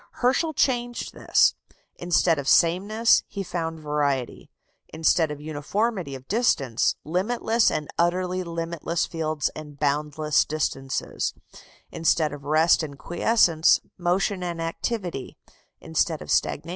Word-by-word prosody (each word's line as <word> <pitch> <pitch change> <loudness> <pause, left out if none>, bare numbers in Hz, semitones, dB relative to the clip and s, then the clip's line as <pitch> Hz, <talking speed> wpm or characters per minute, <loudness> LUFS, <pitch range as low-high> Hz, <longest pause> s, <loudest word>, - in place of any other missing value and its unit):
Herschel 270 +6 +1
changed 245 -3 -1
all - - -12
this. - - +4 0.4
Instead 175 -2 +2
of 140 - -5
sameness, 200 +9 +4
he 200 -1 -5
found 165 -2 -4
variety; 145 -4 -2 0.4
instead 160 0 +2
of 150 -1 -6
uniformity 155 - -2
of 130 0 -12
distance, 145 - +1
limitless 220 +7 +1
and 150 - -3
utterly 180 +2 +1
limitless 170 -1 -2
fields 155 -3 -2
and 150 -2 -10
boundless 150 +1 +1
distances; 135 -3 -3 0.6
instead 160 -1 +1
of 145 -1 -9
rest 155 +4 +4
and 145 -3 -6
quiescence, 175 -1 +3 0.2
motion 185 +2 0
and 175 -2 -4
activity; 170 - -4 0.4
instead 160 0 0
of - - -6
stagnation, 150 +3 0
life. - - -8
165 Hz, 125 wpm, -25 LUFS, 150-185 Hz, 0.6 s, this